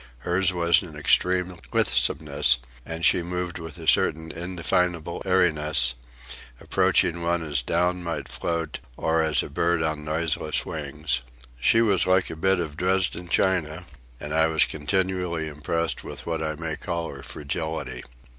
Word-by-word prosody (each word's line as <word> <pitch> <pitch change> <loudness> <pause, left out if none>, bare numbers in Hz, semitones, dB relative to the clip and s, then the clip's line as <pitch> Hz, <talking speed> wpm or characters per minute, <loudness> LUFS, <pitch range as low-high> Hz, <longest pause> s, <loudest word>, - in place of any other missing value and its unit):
Hers 90 +1 +2
was 85 -2 +3
an 85 -5 -10
extreme 90 +4 +2 0.2
lithesomeness, 70 -5 +2 0.3
and 80 0 -2
she - - +5
moved 90 0 -4
with 80 -3 -8
a - - -9
certain 80 +1 +3
indefinable 85 -1 -1
airiness, 75 -8 +3 0.7
approaching 85 0 +2
one 85 0 0
as 75 -4 -1
down 90 +6 0
might 80 -5 -3
float 85 -1 -3 0.2
or 80 0 +1
as 80 -3 +2
a - - -6
bird 85 -1 +1
on 80 -1 -2
noiseless 75 -2 0
wings. 75 -2 -2 0.4
She 115 - +4
was 100 -5 +3
like 95 0 +3
a - - -6
bit 95 +3 +2
of 80 -3 -4
Dresden 90 -1 0
china, 90 -2 +1 0.3
and 75 0 -5
I 80 0 +4
was 80 -1 +3
continually 90 0 -1
impressed 80 +3 -2
with - - -8
what 85 -1 -2
I 80 0 -2
may 80 0 -4
call 85 0 -4
her 70 - -9
fragility. 80 +3 -4
85 Hz, 150 wpm, -25 LUFS, 75-90 Hz, 0.7 s, she